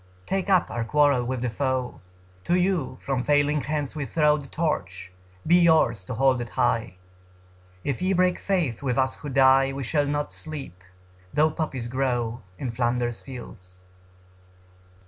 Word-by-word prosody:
Take 195 0 -2
up 185 -3 +3
our 120 - -2
quarrel 140 +1 +3
with 125 0 -3
the 125 - 0
foe: 130 -1 -2 0.4
To 175 - +2
you 180 -8 0
from 135 -2 -2
failing 145 +2 +2
hands 150 -1 -3
we 145 -3 -3
throw 150 -2 +3
The 145 -2 -9
torch; 95 - -3 0.3
be 175 +2 +5
yours 160 - +4
to 115 - -5
hold 130 0 +3
it 120 - -5
high. 115 -6 +1 0.9
If 140 -4 -2
ye 185 +1 +1
break 180 -1 +2
faith 170 - -1
with 130 -2 -1
us 130 0 +2
who 145 - -7
die 135 0 +5
We 135 0 -5
shall 145 +3 0
not 145 0 -2
sleep, 135 - -7 0.5
though 155 +1 +3
poppies 140 -7 -3
grow 120 -2 -1 0.2
In 125 - -3
Flanders 120 0 -1
fields. 95 -8 -11
135 Hz, 160 wpm, -25 LUFS, 120-150 Hz, 0.9 s, be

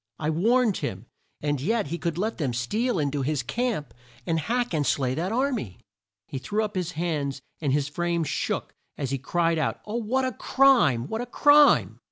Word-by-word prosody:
I 155 0 -1
warned 225 +6 +2
him 95 +4 -4 0.4
and 145 -2 -1
yet 215 0 0
he 170 +2 -3
could 170 -2 -2
let 215 +3 -2
them 130 -6 -1
steal 215 - 0
in 145 -3 0
to 145 -1 -2
his 140 -1 -1
camp 205 - -2 0.3
and 165 -1 0
hack 240 +6 -1
and 155 -2 +1
slay 130 -1 +1
that 175 +8 -2
ar 265 +5 +1
my!" 110 - -4 0.5
He 135 - -5
threw 215 +9 -1
up 210 -1 -3
his 180 -2 -2
hands, 150 -4 -2 0.2
and 145 -4 0
his 145 0 +1
frame 170 +2 -1
shook, 150 - -2 0.2
as 135 -3 -3
he 135 - -1
cried 165 +4 +1
out 155 - -1
"O 215 +2 -3
what 250 +4 0
a 255 - -1
crime! 235 - +3
what 220 +6 -3
a 245 - -5
crime!" 290 +4 +5
170 Hz, 205 wpm, -26 LUFS, 145-225 Hz, 0.5 s, crime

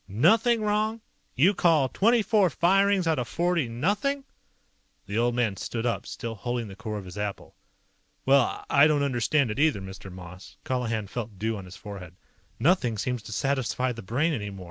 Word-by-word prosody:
"Nothing 225 - +3
wrong? 215 +2 0 0.4
You 170 +11 +4
call 160 -7 +3
twenty 225 - +3
four 205 -4 +3
firings 195 +4 +3
out 160 -4 +1
of 120 - -3
forty 170 -5 0
nothing?" 205 - -1 0.8
The 100 +3 -2
old 120 0 +1
man 115 -5 0
stood 115 0 -4
up, 120 - -1
still 115 -1 -5
holding 120 0 -4
the 95 - -9
core 110 0 -5
of 100 - -7
his 90 +3 -8
apple. 105 -1 -5 0.7
"Well, 135 -1 +3
I 145 +1 +6
don't 150 -2 +2
understand 130 0 +1
it 105 - -4
either, 150 -8 +3
Mr. 95 0 -9
Moss." 90 +1 -11
Colihan 115 -4 -1
felt 110 -1 -6
dew 110 +3 -1
on 100 -2 -7
his 90 0 -11
forehead. 95 -5 -9 0.4
"Nothing 140 - +2
seems 125 +2 -2
to 110 - -10
satisfy 130 +1 0
the 115 -1 -7
Brain 135 - 0
anymore. 105 -6 -5
125 Hz, 180 wpm, -26 LUFS, 105-170 Hz, 0.8 s, I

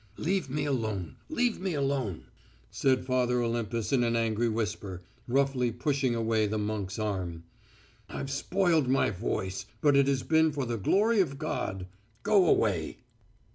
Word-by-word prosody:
"Leave 180 -3 -1
me 145 +2 -1
alone... 110 - -2
leave 245 -7 0
me 185 -3 -2
alone," 135 - -1 0.5
said 130 -2 +1
Father 125 -1 +1
Olympus 115 0 -1
in 125 -3 +3
an 115 0 +1
angry 115 0 +1
whisper, 105 -4 -3 0.3
roughly 130 -1 +1
pushing 130 +1 0
away 110 -2 +1
the 110 +1 -2
monk's 105 -2 -3
arm. 95 -6 -3 0.7
"I've 135 - -5
spoilt 165 +1 +1
my 130 -3 +2
voice, 95 -1 -3
but 145 +3 +4
it 140 -1 +4
has 135 -2 +1
been 160 -1 +3
for 140 -2 -2
the 120 -1 -2
glory 210 - +3
of 140 -8 +1
God. 95 -11 -3 0.4
Go 200 -4 +4
away!..." 95 - +1
125 Hz, 150 wpm, -29 LUFS, 110-145 Hz, 0.7 s, but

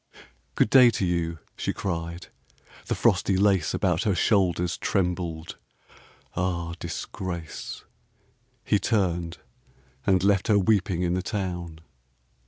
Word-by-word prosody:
"Good - - +2
day 130 -2 +8
to 105 -4 -1
you," 85 -2 -1 0.2
she - - -2
cried, 85 -2 -4 0.6
the - - 0
frosty 95 - +2
lace 95 -5 +2
About 90 -3 +1
her 100 -3 +1
shoulders 90 -4 +2
trembled. 85 -4 -2 0.8
Ah 85 -2 -1
disgrace! 85 -4 -6 0.8
He 105 - +2
turned, 90 -7 0 0.7
and 95 -2 +3
left 100 -1 +3
her 105 - +4
weeping 95 -3 +2
in 85 0 +1
the 90 - 0
town. 90 -6 -4
90 Hz, 115 wpm, -26 LUFS, 85-100 Hz, 0.8 s, day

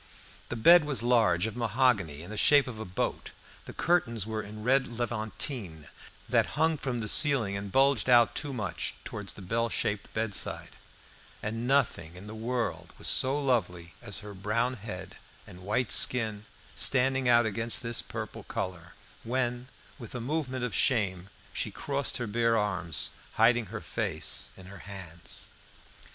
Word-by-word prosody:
The - - -3
bed 170 +9 +7
was 145 -5 0
large, 115 -7 +3
of 110 - -4
mahogany, 110 - +1
in 90 - -10
the - - -5
shape 145 +6 +5
of 115 -4 -8
a 110 - -5
boat. 90 - -3 0.4
The - - -8
curtains 115 - +1
were 110 0 -3
in 105 +1 -9
red 130 +2 +2
levantine, 110 - -5 0.4
that - - +1
hung 160 0 +2
from 125 -4 -3
the 105 - -4
ceiling 130 -8 +4
and 100 0 -5
bulged 135 +1 +3
out 120 -2 +6
too 145 -1 -4
much 100 -10 -4
towards 105 -1 -6
the 100 - -11
bell 115 +5 -1
shaped 105 -1 -2
bedside; 110 -2 -2 0.7
and 115 +3 -3
nothing 115 - +1
in 90 +3 -10
the 105 - -8
world 110 -7 -3
was - - -1
so 135 +3 +5
lovely 95 -11 -1
as 100 - -3
her 105 - -8
brown 110 +6 -1
head 100 -5 -8 0.3
and 90 - -13
white 105 +3 -1
skin 110 -4 +3 0.3
standing 130 -1 +3
out 120 -1 +5
against 115 +3 0
this 115 -1 0
purple - - -7
colour, 90 -2 -6 0.3
when, 125 +1 -2 0.3
with 120 0 -9
a - - -3
movement 130 0 -3
of 120 - -5
shame, 95 -4 +1 0.2
she - - -2
crossed 140 -1 -2
her 120 - -3
bare 115 +1 +1
arms, 90 -6 +1 0.2
hiding 115 0 +3
her 110 +3 -6
face - - -2
in 95 - -12
her 95 0 -11
hands. 90 -4 -9
115 Hz, 165 wpm, -29 LUFS, 100-125 Hz, 0.7 s, bed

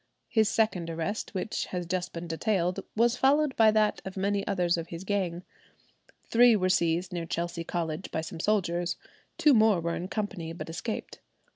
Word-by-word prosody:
His 220 -2 +3
second 195 -8 +1
arrest, 165 +7 -3
which 190 +3 -2
has 180 -1 -4
just 180 +1 -2
been 170 0 -6
detailed, 180 +2 0 0.2
was 235 +2 +3
followed 280 +2 +3
by 225 -1 +6
that 215 -1 +2
of 190 0 -7
many 200 +1 0
others 180 -3 +1
of 165 -1 -4
his 170 +1 -7
gang. 185 -3 -1 0.8
Three 240 0 +6
were 185 -3 +1
seized 170 0 +1
near 170 -2 -3
Chelsea 170 0 -3
College 165 0 -3
by 160 - -2
some 160 - -7
soldiers; 175 -3 0 0.4
two 300 -3 +5
more 220 -5 +5
were 170 0 -2
in 180 - -4
company, 195 -6 -4
but 165 -1 -7
escaped. 215 +6 -5
185 Hz, 175 wpm, -28 LUFS, 170-215 Hz, 0.8 s, by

